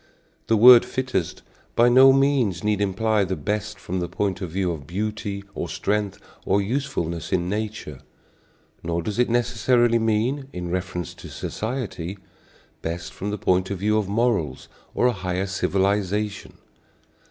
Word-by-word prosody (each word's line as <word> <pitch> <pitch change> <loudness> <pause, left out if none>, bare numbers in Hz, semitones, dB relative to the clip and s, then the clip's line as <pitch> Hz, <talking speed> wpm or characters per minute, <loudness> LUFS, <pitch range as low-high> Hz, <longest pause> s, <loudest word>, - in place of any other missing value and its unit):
The 115 - +3
word 120 +2 +9
"fittest" 130 -10 -3 0.3
by 120 - +5
no 130 +2 +8
means 135 -10 +2
need 105 -1 +1
imply 105 +2 +1
the 95 0 -2
best 105 +1 -3
from 95 +1 -4
the 90 - -2
point 100 -2 -2
of 90 - -3
view 90 +1 -1
of 75 -4 -7
beauty 100 +1 -3
or - - -4
strength 105 -1 -1 0.3
or 100 - +2
usefulness 100 - -2
in 90 -1 +1
nature; 105 -8 -4 0.8
nor 85 0 -2
does 105 +5 -3
it 125 - +3
necessarily 120 0 +2
mean, 115 +5 0
in 90 -5 -5
reference 90 -1 -3
to - - -11
society, 105 -6 -4 0.6
best 85 0 -5
from 100 - -4
the 105 - -2
point 95 -1 +1
of 100 - -3
view 105 +3 +2
of 100 -3 -3
morals 100 - 0 0.3
or - - +2
a 125 - +5
higher 95 -1 -2
civilization. 100 +1 -1
100 Hz, 155 wpm, -24 LUFS, 90-115 Hz, 0.8 s, word